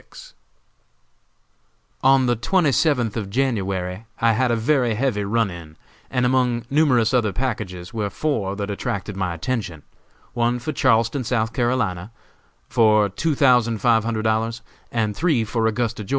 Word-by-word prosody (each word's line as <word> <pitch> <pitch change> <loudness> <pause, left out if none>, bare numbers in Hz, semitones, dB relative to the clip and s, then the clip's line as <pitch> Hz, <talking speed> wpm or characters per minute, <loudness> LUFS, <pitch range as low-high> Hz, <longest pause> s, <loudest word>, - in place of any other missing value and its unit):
_ - - -13 1.7
On 135 0 +4
the 120 -1 +2
twenty 160 - +1
seventh 125 -5 +1
of 105 -4 -4
January 100 -5 -2
I 115 0 +3
had 125 +3 +1
a 120 - +2
very 120 -1 +1
heavy 115 -4 0
run 110 0 0
in, 80 -3 -11 0.3
and 125 -1 0
among 125 -2 +1
numerous 130 -6 +3
other 115 -5 +2
packages 105 -8 -4
were 105 -3 -2
four 100 -4 -2
that 100 0 -4
attracted 100 0 -4
my 90 -3 -2
attention; 90 - -4 0.5
one 120 +1 +1
for 125 +6 -4
Charleston, 115 -1 +2
S. 120 - -6
C., 115 -5 -1 0.6
for 110 -2 +3
two 150 - -1
thousand 125 -4 +3
five 115 +1 +3
hundred 110 -1 -2
dollars, 110 +1 -1 0.3
and 110 -3 -1
three 160 -9 +1
for 110 +1 -1
Augusta, 115 -1 -2
Geo. - - -13
115 Hz, 150 wpm, -22 LUFS, 105-125 Hz, 1.7 s, On